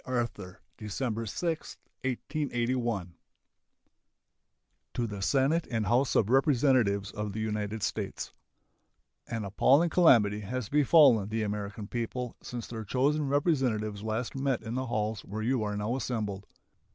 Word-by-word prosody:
Arthur 120 -9 -3 0.2
December 115 +2 -3
6, 165 - -3 0.3
1881 120 - -2 1.8
To 120 - 0
the 105 -3 -6
Senate 140 - +2
and 115 -3 -1
House 120 +7 +2
of 110 +2 +3
Representatives 125 -8 +3
of 105 -1 -4
the 110 - -4
United 105 0 -2
States: - - -3 0.9
An 115 -3 -3
appalling 140 - +3
calamity 115 - +5
has 115 +3 -4
befallen 140 - +5
the 110 0 -1
American 105 0 -4
people 120 +1 -4
since 120 -1 -6
their 115 -2 -6
chosen 140 +7 +1
representatives 130 - 0
last 110 +3 -2
met 135 -3 -1
in 115 +1 -5
the 130 +1 -2
halls 110 -3 -2
where 110 +2 -5
you 125 +1 +1
are 105 -1 -2
now 105 +4 -1
assembled. 105 -6 -3
115 Hz, 130 wpm, -29 LUFS, 105-130 Hz, 1.8 s, calamity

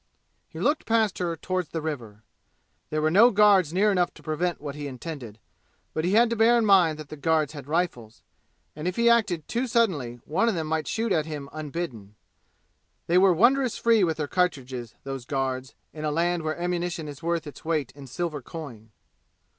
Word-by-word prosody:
He - - -10
looked 300 +2 0
past 225 -3 +2
her 170 -2 -1
toward 185 +1 -2
the 165 - -4
river. 120 -9 -6 0.7
There 155 0 -1
were 155 - +2
no 215 +7 +7
guards 200 -6 +5
near 200 +4 +3
enough 180 -3 +1
to - - -15
prevent 170 +2 -1
what 145 -1 -6
he 145 0 -6
intended; 130 -5 -7 0.6
but 155 - -1
he 180 +3 +1
had 235 +3 +6
to - - +1
bear 230 +2 +5
in 230 - +2
mind 180 -6 +5
that 155 -2 -9
the - - -7
guards 155 0 +1
had 145 -3 -9
rifles, 150 -9 -2 0.5
and 155 +3 -4
if 180 - -1
he 235 0 +4
acted 200 -9 +1
too 245 +3 -1
suddenly 180 - +1
one 195 +10 +1
of 220 - -1
them 160 -2 -2
might 160 0 -2
shoot 225 0 -1
at 160 -4 +1
him 145 -3 -6
unbidden. 145 - -6 0.9
They 175 +2 +4
were 190 0 +6
wondrous 245 +7 +3
free 230 -3 +3
with 160 -3 0
their 150 -2 -2
cartridges, 130 -10 -2
those 135 -2 -5
guards, 130 -1 -3 0.2
in 155 - -7
a 155 - 0
land 170 +3 0
where 155 +1 -3
ammunition 175 -2 -2
is 145 -1 -9
worth 170 -1 -1
its 145 - -10
weight 155 -6 -1
in 140 -1 -12
silver 155 +2 -3
coin. 125 -7 -9
160 Hz, 200 wpm, -26 LUFS, 145-185 Hz, 0.9 s, no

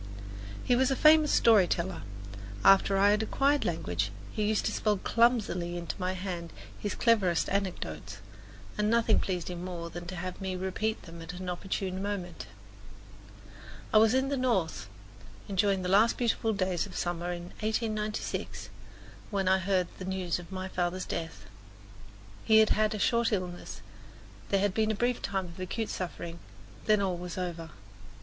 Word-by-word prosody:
He 245 - +3
was 260 +1 +3
a 270 - +1
famous 305 +1 +6
story 215 -6 +6
teller; 175 +2 -2 0.6
after 195 0 +6
I 200 +1 +5
had 210 +1 +2
acquired 275 +6 +2
language 100 - -1 0.2
he - - -3
used 215 0 +1
to - - +1
spell 210 -2 +1
clumsily 200 -7 +1
into 170 -1 -4
my 185 0 -1
hand 180 -3 -5 0.3
his 205 - -3
cleverest 200 -8 +3
anecdotes, 105 - -3 0.6
and 210 0 +2
nothing 230 -1 +4
pleased 180 -3 -2
him 175 0 -6
more 170 -2 -5
than 175 +1 -7
to 185 - -5
have 185 +2 -5
me 190 -1 -2
repeat 190 +4 -2
them 165 -1 -10
at 165 +2 -7
an 180 +1 -7
opportune 185 +1 -3
moment. 195 -4 -4 1.5
I 215 - +8
was 220 +2 +5
in 265 +1 +2
the 280 - 0
North, 225 -11 0 0.6
enjoying 195 -1 +1
the - - -1
last 205 +5 +4
beautiful 230 -2 +1
days 185 -2 0
of 190 - -12
the - - -5
summer 175 0 -2
of 175 - -5 0.2
1896, 215 -1 -2 0.6
when 195 -3 -1
I 190 0 +4
heard 185 -1 +1
the 185 - -5
news 185 -2 -1
of 175 +2 -11
my 185 0 -4
father's 180 0 -2
death. 165 -1 -5 1.0
He 220 - +5
had 220 -1 +6
had 215 0 +2
a - - -2
short 235 +3 +2
illness, 180 -3 -4 0.7
there 195 -1 +2
had 200 -2 +1
been 220 +1 +1
a 220 - +1
brief 240 +3 0
time 195 -1 -2
of 170 0 -11
acute 210 +4 -3
suffering, 170 -2 -5 0.5
then 215 -1 +4
all 185 -2 0
was 180 0 -6
over. 170 -3 -4
190 Hz, 170 wpm, -30 LUFS, 175-215 Hz, 1.5 s, I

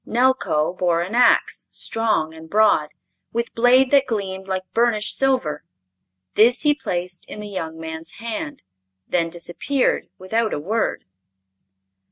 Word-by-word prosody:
Nelko 235 -11 +1
bore 175 -2 +1
an 185 +5 -7
ax, 245 -1 +3
strong 220 -9 0
and 160 0 -12
broad, 205 -7 +3 0.4
with 235 0 -3
blade 250 +3 +4
that 280 -1 +4
gleamed 190 -4 -3
like 190 -1 -2
burnished 225 -2 +2
silver. 255 - 0 0.7
This 235 +4 +5
he 295 -1 +5
placed 180 -9 -4
in - - -8
the 210 - -6
young 165 -5 -5
man's 160 +1 -7
hand, 225 -10 -6 0.4
then 170 -2 0
disappeared 175 +11 -1
without 220 +4 -1
a - - -3
word. 215 +8 -1
210 Hz, 135 wpm, -22 LUFS, 170-235 Hz, 0.7 s, This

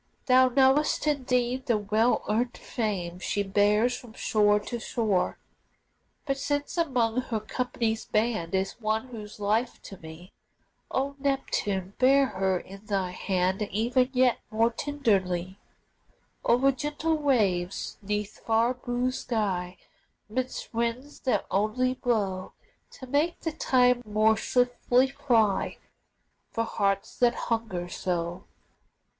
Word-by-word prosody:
Thou 255 0 +6
knowest 270 +5 +3
indeed 255 -3 0
the 235 -3 +3
well 215 +3 +1
earned 240 +4 0
fame 185 -6 -3
She 205 +2 -1
bears 210 +5 +2
from 240 -3 -11
shore 210 -2 +3
to 235 +3 -5
shore. 220 -5 0 0.9
But 275 -2 -1
since 290 +1 -2
among 255 -8 +1
her 230 -3 -3
company's 225 0 -2
band 215 -6 0
Is 190 +5 -2
one 220 +3 -1
who's 215 -3 -9
life 220 +4 0
to 195 - -10
me, 160 +3 -11 0.6
O 275 +1 -1
Neptune, 205 -9 -1
bear 270 +2 +5
her 190 -6 0
in 195 +3 -12
thy 195 -3 -1
hand 185 +1 -1
E'en 245 +4 +2
yet 255 -2 +3
more 225 +2 +2
tenderly, 195 -10 -1 0.8
O'er 255 +3 +4
gentle 295 +4 -1
waves, 200 -11 0
'neath 210 0 -3
fair 230 +2 +2
blue 250 0 -2
sky, 190 -8 -2 0.5
'Midst 255 +4 -4
winds 235 +5 -2
that 245 -7 0
only 230 +6 +1
blow 205 -7 -1 0.4
To 260 - -10
make 290 +6 0
the 325 - -2
time 250 -5 +3
more 215 0 +3
swiftly 245 +2 +2
fly 225 -8 +1 0.7
For 230 - -1
hearts 200 -3 -1
that 240 -1 +4
hunger 220 -7 -2
so. 175 0 -3
225 Hz, 125 wpm, -27 LUFS, 200-255 Hz, 0.9 s, Thou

